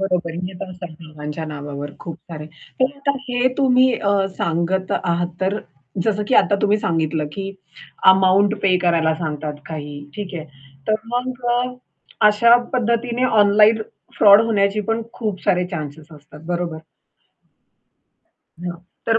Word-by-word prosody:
बरोबर 180 -3 0
आहे, 170 - -6
येत 185 -2 -11
असता 185 -1 -7
बाबांच्या 155 0 -7
नावावर 145 -1 -6
खूप 165 -2 -7 0.2
सारे. 150 -1 -6 0.3
तर 265 +2 +2
आता 280 0 0 0.2
हे 245 +1 +2
तुम्ही 255 -1 +4
अ, 200 -2 +1
सांगत 170 +3 0
आहात, 175 0 +1
तर 190 +2 +1
अ, - - -7 0.4
जसं 210 -1 +1
की 260 - +2
आता 200 - +5
तुम्ही 210 +1 +3
सांगितलं 160 -4 0
की 195 +2 -4 0.6
अमाउंट 190 +2 +4
पे 185 -2 +4
करायला 165 -2 +2
सांगतात 155 -2 -4
काही, 150 -2 -6 0.2
ठीक 200 -3 -6
आहे. 160 - -5 0.4
तर 215 - +4 0.2
मग 250 0 -3
अ, 245 +1 +2 0.6
अशा 235 +3 +6 0.2
पद्धतीने 235 +1 0
ऑनलाईन 215 -1 +5 0.4
फ्रॉड 205 0 +8
होण्याची 205 -2 +1
पण 225 +1 0
खूप 210 -5 -4
सारे 180 0 +2
चान्सस 155 -2 -7
असतात, 150 0 -14
बरोबर. 175 -2 -2 1.8
हां, 175 0 -5 0.3
तर 225 0 +3
190 Hz, 145 wpm, -20 LUFS, 160-220 Hz, 1.8 s, फ्रॉड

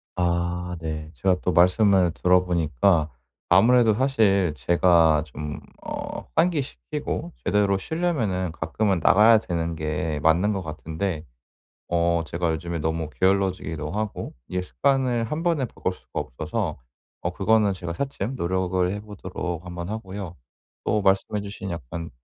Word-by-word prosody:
아 90 0 -1
네. 80 -1 -5
제가 90 +8 +2
또 90 - 0
말씀을 90 0 +4
들어 90 +1 +3
보니까 85 -1 +2 0.4
아무래도 120 -2 +5
사실 105 - +2
제가 85 -3 +4
좀 75 0 -6 0.3
어 - - -5
환기시키고 140 - -1
제대로 100 -1 +2
쉬려면은 110 - -1
가끔은 90 +4 0
나가야 110 +7 +7
되는 85 -4 -3
게 80 0 -2
맞는 85 +7 +3
것 95 - -2
같은데 80 +1 -4 0.6
어 85 -1 +1
제가 85 0 -1
요즘에 85 +1 -3
너무 80 0 -2
게을러지기도 95 -4 0
하고 105 +1 -4
이게 90 0 -2
습관을 130 +3 +1
한 150 +8 -3
번에 165 -6 +1
바꿀 95 -5 -3
수가 - - -7
없어서 65 - -3 0.4
어 90 - -1
그거는 105 +2 +3
제가 85 -2 -5
차츰 135 +1 -3
노력을 90 -2 0
해 100 - -3
보도록 90 -4 -6
한번 90 0 -6
하고요. 100 -4 -6 0.5
또 105 - +1
말씀해 95 +1 +2
주신 100 -1 -7
약간 85 +1 -6
90 Hz, 295 characters per minute, -24 LUFS, 85-105 Hz, 0.6 s, 나가야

